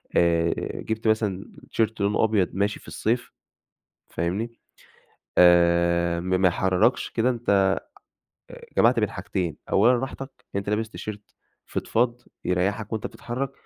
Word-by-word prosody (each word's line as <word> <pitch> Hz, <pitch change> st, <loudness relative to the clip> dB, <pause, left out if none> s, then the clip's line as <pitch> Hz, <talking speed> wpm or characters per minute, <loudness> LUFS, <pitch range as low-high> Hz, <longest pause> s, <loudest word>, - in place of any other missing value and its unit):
آآ 85 Hz, -1 st, +3 dB, 0.3 s
جِبت 110 Hz, 0 st, -3 dB
مثلًا 105 Hz, -3 st, +1 dB, 0.2 s
تيشيرت 110 Hz, -1 st, 0 dB
لونه 100 Hz, +2 st, +2 dB
أبيض 105 Hz, -4 st, +2 dB
ماشي 100 Hz, +2 st, 0 dB
في -, -, -18 dB
الصيف 120 Hz, +3 st, -1 dB, 0.8 s
فاهمني؟ 105 Hz, +8 st, -3 dB, 0.8 s
آآ 85 Hz, -1 st, +4 dB
ما 95 Hz, +1 st, 0 dB
ما 95 Hz, 0 st, +4 dB
يحِرّركش، 90 Hz, +1 st, +1 dB
كده 125 Hz, +3 st, +1 dB
أنت 100 Hz, -5 st, +2 dB, 0.8 s
أ -, -, -10 dB, 0.2 s
جمعت -, -, +4 dB
بين -, -, 0 dB
حاجتين، 85 Hz, -4 st, -3 dB
أولًا 115 Hz, +6 st, +5 dB
راحتك، 135 Hz, +2 st, -5 dB, 0.3 s
أنت 100 Hz, 0 st, -3 dB
لابس 110 Hz, +1 st, -1 dB
تيشيرت 105 Hz, -2 st, -8 dB, 0.3 s
فِضفاض 120 Hz, +1 st, 0 dB, 0.2 s
يريّحك 95 Hz, +4 st, -1 dB
وأنت 110 Hz, -1 st, -2 dB
بتتحرّك 130 Hz, +3 st, -5 dB
100 Hz, 125 wpm, -25 LUFS, 90-110 Hz, 0.8 s, أولًا